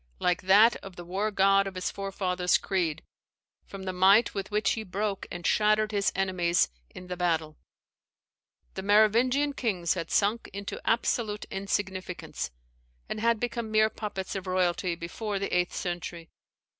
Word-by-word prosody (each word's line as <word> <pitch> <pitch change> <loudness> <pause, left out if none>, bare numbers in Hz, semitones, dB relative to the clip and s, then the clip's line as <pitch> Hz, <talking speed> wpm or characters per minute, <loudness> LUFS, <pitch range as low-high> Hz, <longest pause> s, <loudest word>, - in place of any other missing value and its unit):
] - - -35
like 180 - 0
that 205 +5 +6
of 195 -2 -11
the 175 - -9
war 195 +5 -1
god 195 -1 +3
of 195 - -7
his 185 - -2
forefathers' 185 -2 0
creed, 175 -6 -1 0.6
from 195 -1 -8
the 185 -1 -3
might 195 +5 +5
with 195 -1 -4
which 210 +1 +1
he 220 - -1
broke 200 0 -3
and 175 0 -7
shattered 215 0 +3
his 200 -2 +1
enemies 185 -3 +1 0.2
in 180 - -11
the 180 0 -5
battle. 160 -3 -1 1.2
The 190 - -5
Merovingian 230 +8 +3
kings 190 - 0
had 165 -3 -5
sunk 215 +3 +1
into 200 0 -6
absolute 225 -2 0
insignificance, 195 -2 -3 0.6
and 215 - -4
had 230 0 +2
become 235 -1 -3
mere 215 0 +3
puppets 200 -3 -5
of 190 -1 -5
royalty 180 -1 0
before 200 +5 -4
the 200 -1 -2
eighth 180 0 +1
century. 175 -1 -5
195 Hz, 155 wpm, -28 LUFS, 180-215 Hz, 1.2 s, that